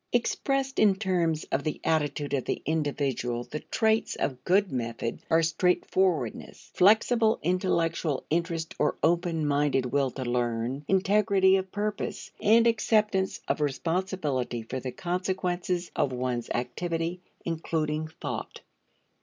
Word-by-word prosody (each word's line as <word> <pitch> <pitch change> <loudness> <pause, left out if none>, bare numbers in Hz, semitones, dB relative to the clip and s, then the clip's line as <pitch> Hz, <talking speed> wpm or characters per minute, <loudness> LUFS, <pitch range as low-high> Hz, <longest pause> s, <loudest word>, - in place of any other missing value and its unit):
Expressed 270 +3 0
in 205 -3 +5
terms 175 -5 0
of 135 - 0
the 155 - -3
attitude 150 -2 0
of 135 -3 0
the - - -3
individual 140 -6 -1
the 135 +5 -6
traits 220 +4 +1
of 130 -3 -3
good 195 +1 +3
method 115 -2 -3
are 165 0 +4
straightforwardness, 175 - 0
flexible 220 +3 +4
intellectual 165 -4 0
interest 165 0 -1
or - - +2
open 170 -1 +1
minded 145 -2 +2
will 135 +2 +1
to 130 +1 -6
learn, 120 +2 -1
integrity 195 0 +4
of 190 -1 -2
purpose, 210 0 -3
and 225 +2 +5
acceptance 215 -4 +2
of - - 0
responsibility 150 - -1
for 130 +3 -4
the 130 0 -5
consequences 180 +1 -2
of 135 - +1
one's 125 -2 -2
activity 165 +8 -2 0.2
including 155 -2 -1
thought. 160 - -6
165 Hz, 125 wpm, -28 LUFS, 140-190 Hz, 0.2 s, in